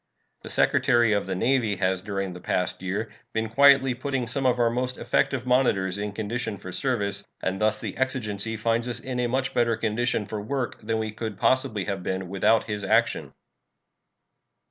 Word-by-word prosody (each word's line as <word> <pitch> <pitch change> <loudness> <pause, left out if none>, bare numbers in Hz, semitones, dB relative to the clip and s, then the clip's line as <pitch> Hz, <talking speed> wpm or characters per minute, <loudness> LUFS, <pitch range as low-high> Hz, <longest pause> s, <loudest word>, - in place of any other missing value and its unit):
The - - -9
Secretary 120 -2 +3
of 100 - 0
the 95 - -2
Navy 115 0 +1
has 95 -1 0
during 100 -2 -3
the 90 - -9
past 90 0 -1
year 100 +4 -3 0.2
been 110 0 -1
quietly 135 +1 +6
putting 130 0 -2
some 135 +3 0
of 125 - +2
our 120 -1 +3
most 125 +1 -2
effective 125 +1 0
monitors 100 -7 +2
in 105 0 -3
condition 110 +1 -3
for 90 - -8
service, 100 -5 0
and 95 +1 -2
thus 110 0 +2
the - - -5
exigency 115 -5 -1
finds 115 +2 0
us 120 -1 -2
in 125 0 -4
a 125 - +1
much 130 +2 -1
better 115 -2 +2
condition 115 0 0
for 105 +1 -5
work 130 +3 -3
than 110 +1 -1
we 110 -1 -2
could 110 -1 -5
possibly 130 -6 +1
have 100 -2 -3
been 95 0 -3
without 105 +4 +3
his 105 -2 -4
action. 95 - +1
110 Hz, 185 wpm, -26 LUFS, 100-125 Hz, 0.2 s, quietly